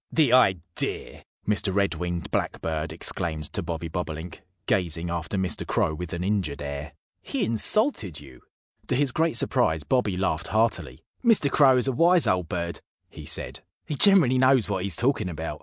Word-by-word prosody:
"The 150 Hz, -7 st, +3 dB
idea!" 90 Hz, -9 st, 0 dB, 0.2 s
Mr. 100 Hz, -1 st, +1 dB
Red 100 Hz, +1 st, +1 dB
winged 85 Hz, -1 st, -4 dB
Blackbird 80 Hz, -1 st, -2 dB
exclaimed 80 Hz, -4 st, -4 dB
to -, -, 0 dB
Bobby 85 Hz, 0 st, -4 dB
Bobolink, 80 Hz, 0 st, -6 dB, 0.2 s
gazing 85 Hz, -3 st, -1 dB
after 85 Hz, +3 st, -3 dB
Mr. 95 Hz, -3 st, 0 dB
Crow 80 Hz, -, +1 dB
with 85 Hz, +2 st, -6 dB
an 85 Hz, +1 st, -3 dB
injured 95 Hz, -8 st, -1 dB
air. 70 Hz, +1 st, -6 dB, 0.3 s
"He -, -, -2 dB
insulted 115 Hz, -, +1 dB
you!" 65 Hz, -3 st, -15 dB, 0.5 s
To -, -, 0 dB
his 140 Hz, 0 st, +1 dB
great 160 Hz, -2 st, 0 dB
surprise 80 Hz, -8 st, +1 dB
Bobby 105 Hz, -, 0 dB
laughed 90 Hz, -4 st, -1 dB
heartily. 110 Hz, -, -1 dB, 0.2 s
"Mr. 220 Hz, -, +4 dB
Crow 135 Hz, -3 st, +5 dB
is 125 Hz, -, +2 dB
a -, -, +2 dB
wise 170 Hz, +6 st, +4 dB
old 90 Hz, -3 st, 0 dB
bird," 85 Hz, -1 st, -3 dB, 0.3 s
he -, -, -11 dB
said, -, -, 0 dB, 0.3 s
"He -, -, -4 dB
generally 150 Hz, -6 st, +5 dB
knows 130 Hz, -3 st, +4 dB
what 95 Hz, -3 st, -2 dB
he's 95 Hz, -3 st, -1 dB
talking 120 Hz, -, +1 dB
about." 80 Hz, -1 st, -5 dB
95 Hz, 170 wpm, -25 LUFS, 80-125 Hz, 0.5 s, Crow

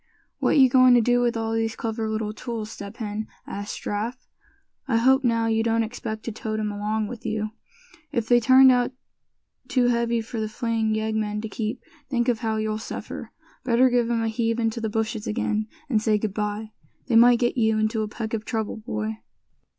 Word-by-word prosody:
"What -, -, +2 dB
you 265 Hz, -2 st, +8 dB
going 255 Hz, 0 st, +6 dB
to -, -, +6 dB
do 245 Hz, +1 st, +3 dB
with 240 Hz, -1 st, +1 dB
all 225 Hz, 0 st, -2 dB
these 225 Hz, 0 st, -1 dB
clever 225 Hz, -1 st, -3 dB
little 215 Hz, -1 st, -2 dB
tools, 225 Hz, -1 st, -5 dB
Step 200 Hz, +1 st, -9 dB
Hen?" 215 Hz, -1 st, -4 dB, 0.2 s
asked 205 Hz, +1 st, -6 dB
Giraffe. 230 Hz, +5 st, -3 dB, 0.6 s
"I 230 Hz, -, +2 dB
hope 265 Hz, +3 st, +4 dB
now, 230 Hz, -2 st, +2 dB
you 225 Hz, 0 st, +2 dB
don't 230 Hz, 0 st, +2 dB
expect 220 Hz, -1 st, -5 dB
to 230 Hz, -, -4 dB
tote 215 Hz, 0 st, -4 dB
'em 210 Hz, -1 st, -1 dB
along 210 Hz, +1 st, -1 dB
with 235 Hz, +2 st, -8 dB
you? 215 Hz, -1 st, -2 dB, 0.6 s
If 235 Hz, -6 st, -1 dB
they 240 Hz, 0 st, +5 dB
turned 260 Hz, +3 st, +7 dB
out 245 Hz, 0 st, +2 dB, 0.8 s
too 250 Hz, -1 st, +2 dB
heavy 235 Hz, -1 st, +1 dB
for 225 Hz, +1 st, -5 dB
the 215 Hz, -1 st, -2 dB
fleeing 225 Hz, -1 st, -1 dB
yeggmen 220 Hz, -1 st, -1 dB
to 220 Hz, -, -4 dB
keep, 220 Hz, +3 st, -4 dB, 0.3 s
think 240 Hz, -2 st, +1 dB
of 235 Hz, -3 st, +1 dB
how 220 Hz, -1 st, -1 dB
you'll 215 Hz, 0 st, -1 dB
suffer. 220 Hz, -, -7 dB, 0.3 s
Better 250 Hz, +1 st, +4 dB
give 240 Hz, -1 st, +2 dB
'em 230 Hz, -1 st, +1 dB
a -, -, 0 dB
heave 225 Hz, 0 st, 0 dB
into 225 Hz, 0 st, -1 dB
the 220 Hz, -, -1 dB
bushes 220 Hz, 0 st, -2 dB
again, 215 Hz, -1 st, -1 dB, 0.2 s
and 225 Hz, -7 st, +1 dB
say 215 Hz, -1 st, +2 dB
good 210 Hz, -1 st, -3 dB
bye. 210 Hz, +1 st, -3 dB, 0.3 s
They 240 Hz, -, 0 dB
might 240 Hz, +1 st, +7 dB
get 240 Hz, 0 st, 0 dB
you 220 Hz, -3 st, +2 dB
into 215 Hz, +1 st, 0 dB
a 215 Hz, -, -1 dB
peck 220 Hz, +1 st, -5 dB
of 220 Hz, -1 st, -2 dB
trouble, 220 Hz, -2 st, -3 dB
boy." 110 Hz, -, -4 dB
225 Hz, 205 wpm, -25 LUFS, 215-235 Hz, 0.8 s, you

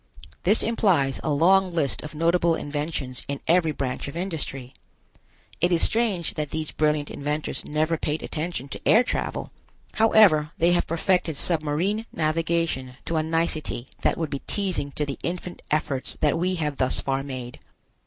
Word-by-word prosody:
This 205 Hz, +5 st, +5 dB
implies 180 Hz, -12 st, +2 dB
a -, -, -1 dB
long 185 Hz, +6 st, +4 dB
list 160 Hz, -6 st, 0 dB
of 155 Hz, -1 st, -8 dB
notable 170 Hz, +1 st, +3 dB
inventions 145 Hz, -4 st, -3 dB
in 140 Hz, 0 st, -3 dB
every 165 Hz, -1 st, +4 dB
branch 130 Hz, -3 st, -3 dB
of 140 Hz, -, -6 dB
industry. 145 Hz, -8 st, -4 dB, 0.9 s
It 175 Hz, +2 st, +3 dB
is 170 Hz, -, +3 dB
strange 215 Hz, -7 st, +1 dB
that 150 Hz, -2 st, -3 dB
these 155 Hz, 0 st, -3 dB
brilliant 150 Hz, -1 st, 0 dB
inventors 150 Hz, +2 st, -3 dB
never 155 Hz, +2 st, 0 dB
paid 150 Hz, +1 st, -2 dB
attention 155 Hz, -4 st, -4 dB
to -, -, -6 dB
air 230 Hz, -, +6 dB
travel. -, -, -3 dB, 0.4 s
However, 190 Hz, -9 st, +5 dB
they 170 Hz, +2 st, +3 dB
have 175 Hz, -, +2 dB
perfected 165 Hz, -2 st, +1 dB
submarine 170 Hz, +8 st, 0 dB
navigation 160 Hz, -4 st, -1 dB
to 165 Hz, -, -1 dB
a -, -, +3 dB
nicety 160 Hz, -5 st, -1 dB
that -, -, +2 dB
would 160 Hz, -2 st, -2 dB
be 140 Hz, -, -2 dB
teasing 190 Hz, -8 st, 0 dB
to 150 Hz, -, -1 dB
the 140 Hz, -1 st, -5 dB
infant 175 Hz, +1 st, -5 dB
efforts 145 Hz, -3 st, -1 dB
that 150 Hz, -2 st, +2 dB
we 185 Hz, +2 st, 0 dB
have 150 Hz, -4 st, -2 dB
thus 130 Hz, -, +1 dB
far 135 Hz, 0 st, -1 dB
made. 130 Hz, -3 st, -7 dB
155 Hz, 165 wpm, -25 LUFS, 145-175 Hz, 0.9 s, air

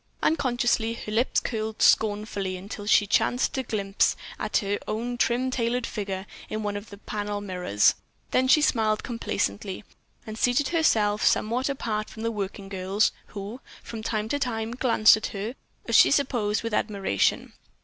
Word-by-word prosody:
Unconsciously 240 Hz, -6 st, +1 dB
her 215 Hz, -, -7 dB
lips 230 Hz, +4 st, +2 dB
curled 220 Hz, -2 st, -4 dB
scornfully 205 Hz, -3 st, +2 dB
until 205 Hz, +2 st, -8 dB
she 210 Hz, -, +5 dB
chanced 245 Hz, +4 st, +1 dB
to 265 Hz, -, -1 dB
catch 260 Hz, -, -11 dB
a -, -, 0 dB
glimpse 195 Hz, 0 st, +1 dB, 0.2 s
of 215 Hz, -, -3 dB
her 200 Hz, 0 st, +1 dB
own 235 Hz, +3 st, -2 dB
trim 245 Hz, +2 st, +1 dB
tailored 245 Hz, 0 st, 0 dB
figure 195 Hz, -2 st, -4 dB, 0.2 s
in 215 Hz, 0 st, -3 dB
one 205 Hz, -1 st, -2 dB
of 205 Hz, +1 st, -7 dB
the 200 Hz, -, -10 dB
panel 205 Hz, 0 st, -4 dB
mirrors; 180 Hz, -, +2 dB, 0.4 s
then 260 Hz, 0 st, +3 dB
she 295 Hz, +3 st, +5 dB
smiled 220 Hz, -6 st, +2 dB
complacently 190 Hz, -, -3 dB, 0.4 s
and 220 Hz, 0 st, -7 dB
seated 245 Hz, +3 st, +2 dB
herself 215 Hz, -11 st, +2 dB
somewhat 245 Hz, +6 st, +2 dB
apart 215 Hz, -6 st, -2 dB
from 220 Hz, -, -9 dB
the 230 Hz, -, 0 dB
working 200 Hz, -2 st, -5 dB
girls, 195 Hz, +2 st, +1 dB, 0.2 s
who, 210 Hz, +5 st, -7 dB, 0.2 s
from 225 Hz, -2 st, -7 dB
time 215 Hz, -1 st, -2 dB
to 285 Hz, +5 st, -1 dB
time, 225 Hz, -4 st, -2 dB
glanced 235 Hz, -3 st, +5 dB
at 215 Hz, -, -3 dB
her, 210 Hz, +4 st, -5 dB, 0.3 s
as -, -, +1 dB
she -, -, +8 dB
supposed, 235 Hz, -7 st, +1 dB
with 230 Hz, -1 st, -3 dB
admiration. 200 Hz, -, 0 dB
215 Hz, 170 wpm, -26 LUFS, 205-240 Hz, 0.4 s, she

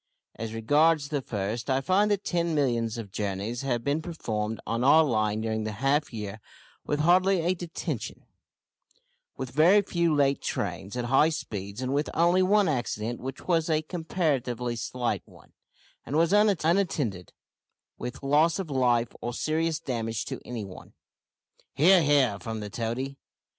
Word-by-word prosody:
As 115 Hz, 0 st, -6 dB
regards 145 Hz, +6 st, +2 dB
the 145 Hz, -3 st, -1 dB
first, 110 Hz, +2 st, -4 dB
I 130 Hz, 0 st, +2 dB
find 190 Hz, +8 st, +2 dB
that 205 Hz, -1 st, 0 dB
ten 170 Hz, -2 st, 0 dB
millions 120 Hz, -6 st, 0 dB
of 110 Hz, -4 st, -7 dB
journeys 105 Hz, +5 st, -3 dB
have 120 Hz, -4 st, -1 dB
been 145 Hz, +4 st, 0 dB
performed 110 Hz, -10 st, -3 dB
on 115 Hz, +1 st, -1 dB
our 155 Hz, +4 st, +7 dB
line 110 Hz, -5 st, 0 dB
during 110 Hz, 0 st, -2 dB
the 110 Hz, 0 st, -3 dB
half 135 Hz, +7 st, 0 dB
year 105 Hz, -2 st, -6 dB, 0.4 s
with 150 Hz, 0 st, -1 dB
hardly 185 Hz, +3 st, +4 dB
a 175 Hz, +3 st, +1 dB
detention, 175 Hz, -2 st, -5 dB, 1.1 s
with 130 Hz, -2 st, -5 dB
very 175 Hz, +9 st, +5 dB
few 170 Hz, -4 st, +1 dB
late 140 Hz, -1 st, +2 dB
trains, 100 Hz, +6 st, -4 dB
at 120 Hz, -, -2 dB
high 135 Hz, +5 st, +4 dB
speeds, 105 Hz, -7 st, -5 dB
and 130 Hz, +1 st, -1 dB
with 145 Hz, +2 st, 0 dB
only 175 Hz, +3 st, +4 dB
one 205 Hz, +2 st, +4 dB
accident, 120 Hz, -4 st, -2 dB
which 135 Hz, +1 st, -7 dB
was 165 Hz, -2 st, +1 dB
a 155 Hz, 0 st, +1 dB
comparatively 140 Hz, -, -2 dB
slight 120 Hz, +1 st, -2 dB
one, -, -, -19 dB, 0.5 s
and 140 Hz, -, -5 dB
was 165 Hz, +3 st, +3 dB
unattended 170 Hz, -, +1 dB, 0.7 s
with 125 Hz, +3 st, -6 dB
loss 150 Hz, +4 st, +3 dB
of 185 Hz, -6 st, -5 dB
life 120 Hz, -3 st, +2 dB
or 120 Hz, 0 st, -4 dB
serious 160 Hz, +2 st, 0 dB
damage 115 Hz, -6 st, -3 dB
to -, -, -6 dB
any 120 Hz, -4 st, -5 dB
one." 95 Hz, -, -12 dB, 0.8 s
"He 170 Hz, +7 st, +6 dB
ar, 185 Hz, -, +6 dB
he 145 Hz, -2 st, +4 dB
ar!" 100 Hz, -5 st, -2 dB
from 110 Hz, +3 st, -5 dB
the 105 Hz, -1 st, -6 dB
toady. 125 Hz, +5 st, -3 dB
135 Hz, 165 wpm, -27 LUFS, 115-165 Hz, 1.1 s, our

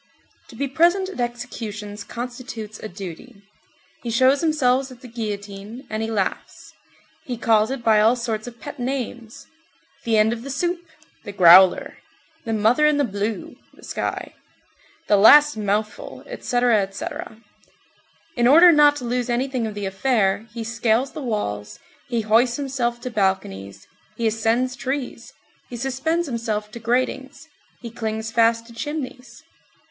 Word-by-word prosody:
To -, -, -14 dB
be 280 Hz, -, -2 dB
present 345 Hz, +7 st, +2 dB
at 380 Hz, -, -9 dB
executions 220 Hz, -4 st, -5 dB
constitutes 235 Hz, -2 st, -7 dB
a -, -, -6 dB
duty. 200 Hz, +4 st, -10 dB, 0.6 s
He 240 Hz, -, -5 dB
shows 260 Hz, +4 st, +3 dB
himself 270 Hz, -5 st, +1 dB
at 255 Hz, -1 st, -14 dB
the 255 Hz, -, -10 dB
guillotine, 210 Hz, +1 st, -6 dB
and 215 Hz, 0 st, -2 dB
he 225 Hz, -, -2 dB
laughs. 205 Hz, -4 st, -4 dB, 0.5 s
He 245 Hz, -2 st, -4 dB
calls 220 Hz, -1 st, +3 dB
it 265 Hz, -2 st, -4 dB
by 220 Hz, -2 st, +4 dB
all 225 Hz, +3 st, +4 dB
sorts 230 Hz, -2 st, -4 dB
of 240 Hz, -1 st, -10 dB
pet 290 Hz, -1 st, -9 dB
names: 245 Hz, -3 st, -5 dB, 0.6 s
The 225 Hz, -1 st, +1 dB
End 215 Hz, +2 st, +4 dB
of 235 Hz, -, -6 dB
the 275 Hz, -, -8 dB
Soup, 345 Hz, +5 st, -2 dB, 0.4 s
The 205 Hz, -, -7 dB
Growler, 185 Hz, 0 st, +6 dB, 0.5 s
The 225 Hz, -, -2 dB
Mother 225 Hz, +8 st, +3 dB
in 300 Hz, -1 st, +2 dB
the 290 Hz, -, +2 dB
Blue 210 Hz, -1 st, -4 dB, 0.2 s
(the -, -, -19 dB
sky), -, -, -4 dB, 0.7 s
The 205 Hz, -, +3 dB
Last 295 Hz, +8 st, +7 dB
Mouthful, 210 Hz, 0 st, -3 dB
etc., 245 Hz, -, +1 dB
etc. 195 Hz, +2 st, -6 dB, 1.0 s
In 240 Hz, -1 st, +3 dB
order 335 Hz, +6 st, +8 dB
not 295 Hz, -2 st, +5 dB
to 255 Hz, -, -7 dB
lose 245 Hz, 0 st, -2 dB
anything 250 Hz, -1 st, -1 dB
of 215 Hz, -, -7 dB
the 205 Hz, -1 st, -4 dB
affair, 200 Hz, 0 st, 0 dB
he 230 Hz, 0 st, -5 dB
scales 230 Hz, +3 st, 0 dB
the 305 Hz, -, -7 dB
walls, 105 Hz, -, -3 dB, 0.3 s
he 235 Hz, -2 st, -1 dB
hoists 230 Hz, +3 st, +3 dB
himself 260 Hz, -4 st, -2 dB
to 255 Hz, -, -5 dB
balconies, 100 Hz, -, -2 dB, 0.3 s
he 235 Hz, -, -2 dB
ascends 225 Hz, +3 st, +1 dB
trees, 265 Hz, +1 st, -5 dB, 0.4 s
he 240 Hz, -, -6 dB
suspends 270 Hz, +7 st, -1 dB
himself 220 Hz, -5 st, -3 dB
to 235 Hz, -, -8 dB
gratings, 255 Hz, +4 st, -2 dB, 0.3 s
he 235 Hz, -2 st, -7 dB
clings 220 Hz, -1 st, -4 dB
fast 230 Hz, 0 st, +2 dB
to 235 Hz, -, -14 dB
chimneys. 270 Hz, -1 st, -6 dB
235 Hz, 150 wpm, -22 LUFS, 215-260 Hz, 1.0 s, order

